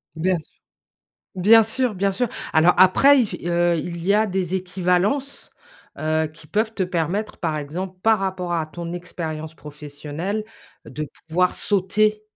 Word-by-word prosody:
Bien 175 +3 +1
sûr. 155 - -11 0.8
Bien 215 +5 +6
sûr, 230 +1 0
bien 195 +1 +1
sûr. 240 +4 -1 0.3
Alors 160 +3 +6
après, 265 +9 +6
il 235 - +2
f 190 - -8
heu, 175 0 +2
il 170 +2 -5
y 200 - +4
a 215 +1 +3
des 190 -2 -2
équivalences, 185 +9 -1 0.5
heu, 155 0 0
qui 155 0 -16
peuvent 215 +6 0
te 210 - -2
permettre, 180 +4 -2
par 160 -3 -2
exemple, 180 +6 -6
par 220 -1 +4
rapport 185 -2 -2
à 165 -2 0
ton 170 +2 -7
expérience 160 -3 -6
professionnelle, 150 +7 -6 0.4
de 155 0 -5 0.2
pouvoir 180 +3 +2
sauter. 210 +2 +1
180 Hz, 155 wpm, -22 LUFS, 160-205 Hz, 0.8 s, Bien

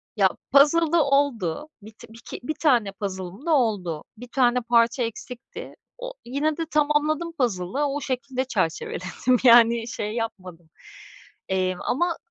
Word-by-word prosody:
Ya 195 -3 +4 0.2
puzzle'da 315 +3 +5
oldu. 275 - 0
Bit 220 +2 -14
biki 230 +1 -10
1 310 - -2
tane 240 -10 +3
puzzle'ım 195 - -6
da 335 - 0
oldu. 200 - 0
1 245 +2 -10
tane 250 0 +2
parça 235 +1 +2
eksikti. 235 +2 -8 0.2
O, - - -7
yine 290 +5 -1
de 330 - -2
tamamladım 305 +2 +1
puzzle'ı. 245 - -1
O 285 +1 -2
şekilde 260 0 -3
çerçeveledim. 190 +2 -1
Yani, 235 -1 +6
şey 210 -2 -4
yapmadım. 185 -8 -6 0.8
Emm, 185 -1 -1
ama 340 +5 0
245 Hz, 130 wpm, -24 LUFS, 205-290 Hz, 0.8 s, Yani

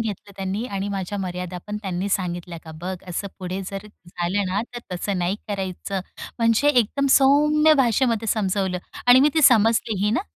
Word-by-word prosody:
घेतलं 205 -2 -5
त्यांनी. 195 +3 -3
आणि 200 -3 -3
माझ्या 200 0 -4
मर्यादा 180 -1 -4
पण 210 0 -4
त्यांनी 190 0 -3
सांगितल्या. 175 -3 -3
का 160 - -10
"बघ 185 +2 -4
असं 180 +3 -3
पुढे 185 0 -4
जर 195 +1 -6 0.2
झालं 180 +3 -1
ना 190 +3 0
तर 240 - -3 0.2
तसं 190 +2 -2
नाही 180 +3 0
करायचं." 195 -1 -3 0.4
म्हणजे 230 +4 +3
एकदम 275 +1 +2
सौम्य 300 +3 +5
भाषेमध्ये 235 -3 +2
समजवलं 190 -3 0 0.3
आणि 245 +1 +8
मी 290 - +5
ती 315 - +3
समजली 225 -3 +4
ही 210 - +2
ना. - - 0
200 Hz, 175 wpm, -23 LUFS, 185-230 Hz, 0.4 s, आणि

